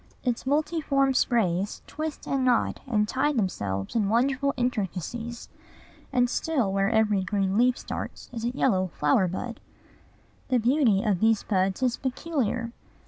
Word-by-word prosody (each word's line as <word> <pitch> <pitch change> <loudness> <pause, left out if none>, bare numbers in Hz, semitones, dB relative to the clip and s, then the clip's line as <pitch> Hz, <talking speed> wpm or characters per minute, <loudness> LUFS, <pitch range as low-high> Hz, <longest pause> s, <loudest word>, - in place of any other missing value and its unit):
Its 245 0 -2
multiform 285 -2 +1
sprays 205 -7 +1
twist 310 0 -5
and 270 -1 0
knot 250 -2 +2
and 210 -4 +1
tie 265 +6 +1
themselves 100 - -2
in 210 -4 +2
wonderful 270 +5 +2
intricacies; 235 0 -3 0.6
and 250 -2 +3
still 250 -6 0
where 195 0 +2
every 215 -3 +2
green 195 0 0
leaf 245 +3 +3
starts - - -6
is 230 -2 -5
a 235 - +1
yellow 185 -7 +2
flower 150 +6 +3
bud. 230 +7 -5 0.9
The 255 - +2
beauty 235 -4 +3
of 200 -5 +1
these 220 0 +3
buds 190 +3 0
is 250 -2 +1
peculiar. 255 -4 -2
235 Hz, 140 wpm, -26 LUFS, 195-260 Hz, 0.9 s, and